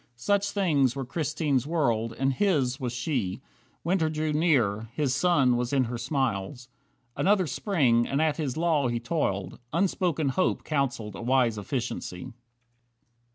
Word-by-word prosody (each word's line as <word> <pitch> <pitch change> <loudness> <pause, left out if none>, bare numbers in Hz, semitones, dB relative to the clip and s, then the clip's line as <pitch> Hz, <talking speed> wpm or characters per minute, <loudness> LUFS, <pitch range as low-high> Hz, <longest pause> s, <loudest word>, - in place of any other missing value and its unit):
Such 200 +11 +1
things 145 - +2
were 135 -1 -3
Christine's 145 -1 -1
world, 115 -9 0
and 135 0 +1
his 140 -7 +1
was 125 -3 -2
she 120 - -2 0.4
Winter 170 -2 +1
drew 155 0 -1
near, 115 -10 +1
his 145 -4 0
sun 140 -5 +3
was 120 0 -2
in 135 -2 +3
her 120 0 -4
smiles. 125 -2 -2 0.5
Another 195 -1 +3
Spring, 130 - +1
and 140 - -1
at 155 -1 +1
his 145 -5 -3
law 160 -5 +2
he 120 -1 -1
toiled, 100 - -2
Unspoken 170 -3 +1
hope 185 +8 0
counselled 125 -8 -2
a - - -7
wise 120 -2 +2
efficiency. 120 0 -4
135 Hz, 145 wpm, -27 LUFS, 120-160 Hz, 0.5 s, sun